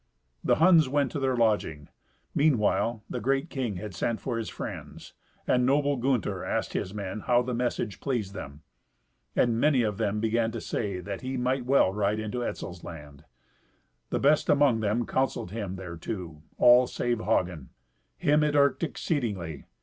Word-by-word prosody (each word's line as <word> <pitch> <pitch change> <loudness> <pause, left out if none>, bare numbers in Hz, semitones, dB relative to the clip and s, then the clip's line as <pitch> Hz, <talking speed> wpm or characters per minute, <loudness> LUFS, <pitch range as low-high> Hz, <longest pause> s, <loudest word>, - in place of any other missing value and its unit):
The - - +3
Huns 160 -4 +5
went 140 0 +1
to 145 - -3
their 130 -2 0
lodging. 105 -10 +1 0.5
Meanwhile, 120 -5 +2
the - - -4
great 135 +6 0
king 125 -7 -2
had 105 +4 -6
sent 115 -2 -1
for 120 -3 -3
his 115 - -4
friends, - - -8 0.3
and 125 0 +2
noble 140 +2 +2
Gunther 125 -4 -1
asked - - -2
his 95 - -2
men 100 0 -5
how 120 +3 +2
the 125 0 -3
message 120 -3 -2
pleased 115 -8 -2
them. 70 -5 -8 0.7
And 115 -2 +2
many 135 -2 +3
of 105 -1 -2
them 105 -1 0
began 115 +1 +1
to - - -3
say 100 -5 -3
that 100 0 -6
he 130 +1 -3
might 125 0 -1
well 130 -8 +4
ride 105 +1 0
into 110 +3 -3
Etzel's 90 -6 -5
land. 75 -3 -10 0.8
The - - 0
best 145 +2 +3
among 140 -5 +4
them 110 +2 0
counselled 130 -9 -1
him 100 -4 -4
thereto—all 90 +6 +1
save 120 -1 -1
Hagen. 85 - -1 0.5
Him 150 - +3
it 150 -1 +1
irked 140 -1 +3
exceedingly. 105 - -3
115 Hz, 165 wpm, -28 LUFS, 100-135 Hz, 0.8 s, Huns